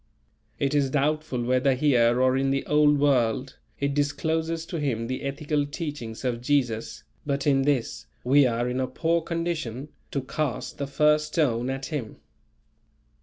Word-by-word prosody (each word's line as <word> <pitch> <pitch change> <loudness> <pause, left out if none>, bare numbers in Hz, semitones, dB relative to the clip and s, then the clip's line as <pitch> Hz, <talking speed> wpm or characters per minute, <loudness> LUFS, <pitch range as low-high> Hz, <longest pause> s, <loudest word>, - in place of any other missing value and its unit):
It 140 +1 0
is 140 -2 +2
doubtful 145 -2 0
whether 130 +2 +2
here 125 -4 +3
or 130 0 +3
in 135 0 +1
the 135 0 0
Old 150 0 +4
World, 130 -2 +1 0.2
it 140 0 0
discloses 160 +3 -1
to 165 -1 -4
him 120 -6 -1
the 130 +2 -4
ethical 145 +2 -1
teachings 145 -7 -6
of 120 -2 -1
Jesus; 125 -5 -1 0.2
but 140 -2 -2
in 135 -2 +3
this, 125 -5 -1 0.2
we 135 +2 +5
are 120 0 -1
in 125 +1 -2
a 130 - 0
poor 170 +3 0
condition 160 -7 -3 0.2
to 140 - -2
"cast 130 -2 -3
the 140 - -2
first 150 +2 +3
stone" 130 -6 0
at 135 0 -3
him. 140 -9 -5
140 Hz, 160 wpm, -26 LUFS, 125-150 Hz, 0.2 s, we